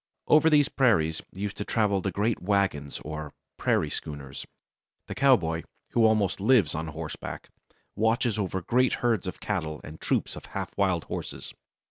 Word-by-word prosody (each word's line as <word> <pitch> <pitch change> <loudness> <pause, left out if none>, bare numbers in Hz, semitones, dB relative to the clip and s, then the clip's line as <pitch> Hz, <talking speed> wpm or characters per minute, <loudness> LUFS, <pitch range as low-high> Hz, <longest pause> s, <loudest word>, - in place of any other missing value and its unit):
Over 155 +1 +6
these 145 -2 +5
prairies 80 - +2
used 100 +2 -5
to - - -2
travel 100 -3 +1
the 95 - -1
great 105 +5 0
wagons 90 -7 0
or 75 -1 -6 0.2
"prairie - - +1
schooners." 70 -3 -6 0.6
The - - -6
cowboy, 90 -12 +3 0.3
who 115 -2 +4
almost 110 -4 +2
lives 105 - +4
on 80 +1 -3
horseback, 80 0 -6 0.5
watches 110 +1 +1
over 95 -2 -2
great 125 +6 +3
herds 115 -6 +2
of 90 - -5
cattle 80 -7 -2
and 75 +1 -10
troops - - 0
of - - -9
half - - -4
wild 95 -4 +1
horses. - - -6
100 Hz, 155 wpm, -27 LUFS, 80-115 Hz, 0.6 s, Over